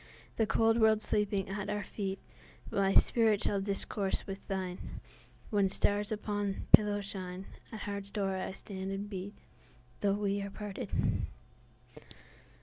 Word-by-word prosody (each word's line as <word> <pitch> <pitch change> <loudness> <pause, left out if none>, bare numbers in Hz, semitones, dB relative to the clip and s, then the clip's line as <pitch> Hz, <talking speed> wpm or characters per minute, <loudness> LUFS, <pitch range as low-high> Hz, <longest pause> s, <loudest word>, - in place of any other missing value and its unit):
The 225 - +3
cold 225 +1 +4
world 220 -1 +5
sleeping 205 -2 +1
at 205 +1 -3
our 210 0 -1
feet, 195 -2 -3 0.5
My 195 0 +2
spirit 220 -3 +5
shall 200 -1 +1
discourse 195 0 -2
with 195 0 -5
thine;—When 190 +2 -3
stars 205 +2 +1
upon 205 -2 -1
thy - - -10
pillow 205 -1 +8
shine, 190 -1 -6 0.2
At - - -25
thy 220 - -5
heart's 200 -1 -4
door 195 -2 -1
I 185 - -3
stand 190 -1 -6
and 195 +1 -3
beat, 200 0 -6 0.6
Though 200 -1 +2
we 200 -1 0
are 200 - -4
parted. 205 0 -6
200 Hz, 145 wpm, -33 LUFS, 195-210 Hz, 0.6 s, pillow